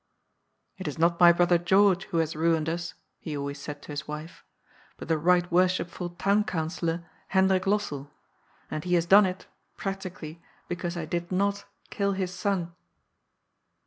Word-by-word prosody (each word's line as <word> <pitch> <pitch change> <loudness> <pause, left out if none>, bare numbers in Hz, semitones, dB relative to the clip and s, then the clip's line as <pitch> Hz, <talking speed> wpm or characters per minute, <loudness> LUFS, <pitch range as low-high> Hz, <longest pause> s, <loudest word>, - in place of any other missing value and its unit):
" - - -49
It 190 - -5
is 150 - -4
not 170 +1 +2
my 175 -1 +9
brother 175 0 +3
George 190 +2 +3
who 170 - -3
has 160 -1 0
ruined 160 0 +1
us," 165 0 -3 0.2
he 150 -2 -5
always 140 0 -5
said 145 0 -7
to - - -9
his 145 +1 -5
wife, 150 +2 -8 0.3
" - - -30
but - - -8
the 160 -2 +1
Sight 175 0 +3
Worshipful 180 0 +1
Town 200 +4 +1
Councillor, 165 -2 -2 0.2
Hendrik 190 -1 +2
Lossell. 150 -9 -1 0.6
And 155 - -3
he 180 0 +1
has 170 -1 +2
done 195 +3 +7
it, 185 0 -6 0.3
practically, 185 -4 -6 0.3
because 175 0 -4
I 165 - -3
did 170 +2 -3
not 200 +2 0 0.3
kill 200 -1 0
his 185 -1 -3
son." 185 -4 -2
175 Hz, 170 wpm, -27 LUFS, 160-190 Hz, 0.6 s, my